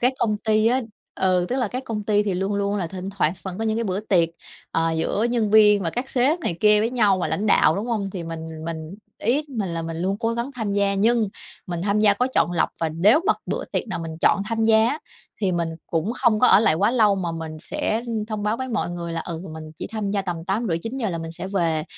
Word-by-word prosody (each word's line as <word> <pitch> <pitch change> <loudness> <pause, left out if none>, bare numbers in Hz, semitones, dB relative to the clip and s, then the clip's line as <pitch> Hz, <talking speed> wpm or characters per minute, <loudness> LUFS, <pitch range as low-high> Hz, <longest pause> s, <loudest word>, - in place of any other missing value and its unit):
các 250 +2 +3
công 215 -2 +1
ty 215 0 +2
á 255 +3 +3 0.3
ừ, 185 -1 +1
tức 255 - -1
là 245 -5 0
các 255 +4 -4
công 210 -3 -4
ty 210 -1 +3
thì 200 -3 -1
luôn 195 +2 -1
luôn 200 0 0
là 185 -4 -1
thỉnh 190 +2 -6
thoảng 180 -5 +1
vẫn 190 +1 -6
có 225 - -2
những 220 0 0
cái 230 - -1
bữa 190 0 -1
tiệc, 180 -6 +2 0.4
ờ, 165 0 +1
giữa 165 +7 0
nhân 225 -4 +1
viên 210 -2 +6
và 165 - -1
các 250 +7 -4
sếp 270 +6 +2
này 195 - -2
kia 210 0 +5
với 225 - 0
nhau 210 -6 +3
và - - -1
lãnh 215 - -1
đạo, - - +4
đúng 210 +4 -3
hông? 210 -5 -2
Thì 185 -3 -5
mình 160 -1 -7
mình 160 +1 -6 0.2
ý 255 +8 +1
của 280 - -15
mình 200 -4 -1
là 165 -1 -3
mình 165 0 -5
luôn 190 +4 -1
cố 230 0 0
gắng 235 +3 -3
tham 220 -4 -2
gia, 200 0 +2
nhưng 225 +2 +2 0.4
mình 175 -1 -4
tham 200 +1 +1
gia 210 -1 +5
có 250 +5 +1
chọn 175 - +3
lọc 170 - +2
và 165 - +1
nếu 200 - +4
mà 430 - +5
bữa - - -2
tiệc - - -1
nào 190 - -3
mình 165 -1 -6
chọn 200 - +3
tham 225 -1 0
gia 220 0 +5
á 295 +5 -2 0.4
thì 195 -3 +1
mình 170 -1 0 0.2
cũng 170 +7 -1
không 235 -4 +3
có 250 - +6
ở 205 - +7
lại 155 -8 +4
quá 200 +6 +2
lâu 220 -5 +4
mà 175 -4 -3
mình 160 -1 -6
sẽ, 225 +2 -2
ưm, 220 -2 -2
thông 215 -2 -4
báo 210 +2 0
với 260 +1 -4
mọi 220 -6 -1
người 170 -1 -5
là, 165 - -2
ừ, 165 -1 -5
mình 155 0 -9
chỉ - - -4
tham 215 -3 -3
gia 200 -1 0
tầm 170 -3 -4
8:30-9:00 220 +3 -2
là 165 - -3
mình 165 0 -6
sẽ 185 - -6
về 165 -5 0
200 Hz, 270 wpm, -23 LUFS, 170-225 Hz, 0.4 s, ở